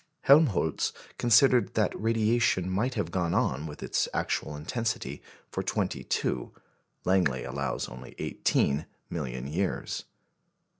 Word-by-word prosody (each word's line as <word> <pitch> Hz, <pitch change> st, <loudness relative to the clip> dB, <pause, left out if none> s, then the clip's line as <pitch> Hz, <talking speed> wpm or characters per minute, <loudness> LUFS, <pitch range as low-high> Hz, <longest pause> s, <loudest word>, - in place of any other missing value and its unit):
Helmholtz 135 Hz, -, +4 dB, 0.3 s
considered 120 Hz, +1 st, +5 dB
that 110 Hz, -, +2 dB
radiation 115 Hz, -4 st, +2 dB
might 105 Hz, +8 st, 0 dB
have 85 Hz, -, -2 dB
gone 85 Hz, -2 st, 0 dB
on 70 Hz, +4 st, 0 dB
with 75 Hz, -, -8 dB
its -, -, 0 dB
actual 75 Hz, -, -1 dB
intensity 110 Hz, -, -3 dB, 0.3 s
for -, -, -2 dB
twenty -, -, -1 dB
two, 60 Hz, -1 st, -1 dB, 0.5 s
Langley 90 Hz, -10 st, +2 dB
allows 70 Hz, +1 st, -3 dB
only 60 Hz, +1 st, -10 dB
eighteen 70 Hz, +3 st, +1 dB, 0.2 s
million 65 Hz, 0 st, -4 dB
years. 85 Hz, +7 st, -2 dB
90 Hz, 115 wpm, -29 LUFS, 70-115 Hz, 0.5 s, considered